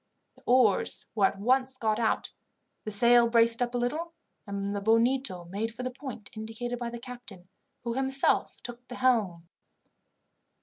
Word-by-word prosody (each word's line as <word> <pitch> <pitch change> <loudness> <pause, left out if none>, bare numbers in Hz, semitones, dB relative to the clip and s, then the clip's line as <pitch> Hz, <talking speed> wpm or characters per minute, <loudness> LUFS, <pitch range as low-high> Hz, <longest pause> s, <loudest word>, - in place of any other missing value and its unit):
The - - -21
oars 245 -5 +3
were 205 -3 +4
at - - -6
once 260 +4 +1
got 220 -2 0
out, 225 -2 -1 0.5
the - - -3
sail 235 +3 +5
braced 230 0 +4
up 245 0 -1
a - - +2
little, 310 +8 -2 0.3
and 200 0 -3
the 200 - -3
Bonito 230 -3 +1
made 205 +6 -3
for 250 - -6
the 255 - -3
point 250 -5 -9
indicated 225 +3 -5
by 240 -1 -3
the 235 - -7
captain, 235 -7 -11 0.3
who 235 -1 -2
himself 270 +1 +1
took 245 0 -9
the 250 - -8
helm. 210 -10 +1
235 Hz, 165 wpm, -28 LUFS, 215-250 Hz, 0.5 s, sail